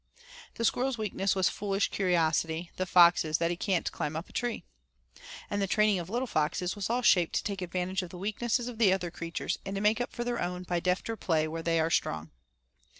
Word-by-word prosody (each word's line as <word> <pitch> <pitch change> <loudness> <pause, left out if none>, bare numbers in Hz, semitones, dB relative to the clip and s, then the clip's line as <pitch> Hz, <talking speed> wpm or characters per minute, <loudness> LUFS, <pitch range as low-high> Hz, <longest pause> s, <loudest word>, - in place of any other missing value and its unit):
The 230 - -1
squirrel's 255 +2 +1
weakness 200 -2 -1
was 190 -2 +3
foolish 200 -1 -1
curiosity; 165 -2 +1
the 185 - -2
fox's 170 -3 +5
that 170 0 0
he - - -1
can't 180 0 -1
climb 150 +1 -3
a 160 - -3
tree. 240 +4 -3 0.8
And 205 - -2
the 195 - +1
training 210 0 +3
of 170 - -6
the 200 - -9
little 245 +2 0
foxes 175 -2 -1
was 205 0 -3
all 245 +2 0
shaped 175 -6 +4
to - - +1
take 200 -2 -3
advantage 180 +2 -2
of 180 - -7
the 180 - -9
weakness 215 +5 0
of 240 -2 -6
the 210 -5 +5
other 180 -2 -1
creatures 170 -1 -4
and 195 0 -5
to - - -1
make 215 +3 +3
up 245 - -3
for 240 - -4
their 240 0 -2
own 180 0 -3
by 175 -1 -1
defter 185 +6 -1
play 160 -7 0
where 165 +1 -4
they 165 0 +1
are 160 +1 +1
strong. 80 - -1
185 Hz, 220 wpm, -29 LUFS, 170-210 Hz, 0.8 s, fox's